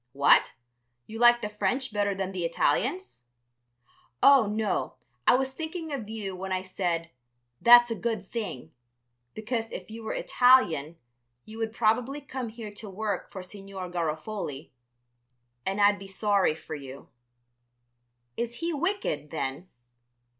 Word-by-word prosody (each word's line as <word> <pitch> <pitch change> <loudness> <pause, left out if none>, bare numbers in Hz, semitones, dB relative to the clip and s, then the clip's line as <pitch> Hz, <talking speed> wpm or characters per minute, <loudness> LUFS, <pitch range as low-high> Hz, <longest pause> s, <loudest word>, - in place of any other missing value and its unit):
"What! 140 +1 +5 0.5
you 225 +1 -8
like 240 0 +6
the 210 - -2
French 250 +4 -1
better 205 -1 0
than 190 0 -3
the 185 -2 -3
Italians?" 170 - -1 1.0
"Oh, 275 -6 +7
no, 210 -12 -1 0.3
I - - +7
was 265 +1 0
thinking 320 +1 -5
of 230 -7 -5
you 205 -4 -5
when 190 +1 -6
I 185 0 -1
said 175 -3 -2 0.5
'that's 240 0 +8
a - - 0
good 225 -4 -2
thing,' 205 - -5 0.6
because 225 +1 -3
if - - -8
you 225 +1 -8
were 220 - -3
Italian 245 - +3 0.5
you 220 +1 -10
would 225 -1 -1
probably 235 +5 +1
come 260 -4 -5
here 220 -1 -8
to 210 0 -8
work 205 +2 -3
for 190 - -8
Signor 195 -1 -8
Garofoli, 160 -2 -4 1.0
and 195 +2 -1
I'd 205 0 +5
be 195 - -9
sorry 195 -3 +2
for 160 - -9
you." 140 -2 -9 1.3
"Is 235 0 -3
he 335 +5 -2
wicked, 295 - -2
then?" 155 +3 -4
210 Hz, 140 wpm, -28 LUFS, 185-240 Hz, 1.3 s, that's